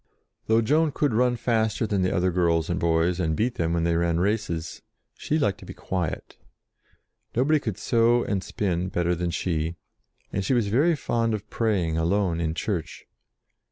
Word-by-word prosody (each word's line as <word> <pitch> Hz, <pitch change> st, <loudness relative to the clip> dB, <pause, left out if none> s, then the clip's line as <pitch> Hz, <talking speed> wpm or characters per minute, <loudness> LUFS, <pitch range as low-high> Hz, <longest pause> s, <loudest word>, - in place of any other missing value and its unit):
Though 110 Hz, +1 st, +4 dB
Joan 155 Hz, +6 st, +2 dB
could 145 Hz, -2 st, 0 dB
run 125 Hz, +2 st, +2 dB
faster 110 Hz, -1 st, 0 dB
than 100 Hz, -3 st, 0 dB
the 90 Hz, -, +1 dB
other 90 Hz, 0 st, +1 dB
girls 85 Hz, -2 st, +1 dB
and 85 Hz, -, -1 dB
boys, 85 Hz, +2 st, +1 dB
and 80 Hz, -3 st, 0 dB
beat 115 Hz, +6 st, 0 dB
them 85 Hz, -1 st, +1 dB
when 85 Hz, -1 st, 0 dB
they 85 Hz, 0 st, +1 dB
ran 85 Hz, 0 st, +1 dB
races, 95 Hz, -4 st, -2 dB, 0.3 s
she 155 Hz, -, -1 dB
liked 120 Hz, -, 0 dB
to -, -, -12 dB
be -, -, -8 dB
quiet. 90 Hz, -4 st, -4 dB, 1.0 s
No 125 Hz, +3 st, +2 dB
body 155 Hz, +1 st, +3 dB
could 110 Hz, -9 st, -4 dB
sew 120 Hz, +1 st, +3 dB
and 95 Hz, -2 st, -2 dB
spin 90 Hz, -2 st, -2 dB
better 85 Hz, -1 st, 0 dB
than 90 Hz, 0 st, -2 dB
she 85 Hz, -1 st, -1 dB
did, 85 Hz, +2 st, -4 dB, 0.6 s
and 100 Hz, -, -1 dB
she 130 Hz, -, +1 dB
was 115 Hz, -4 st, +1 dB
very 150 Hz, +10 st, +3 dB
fond 115 Hz, -5 st, 0 dB
of 105 Hz, 0 st, -8 dB
praying 90 Hz, -8 st, 0 dB
alone 85 Hz, 0 st, +1 dB
in 80 Hz, -1 st, -1 dB
church. 90 Hz, -4 st, -4 dB
95 Hz, 190 wpm, -25 LUFS, 85-115 Hz, 1.0 s, Though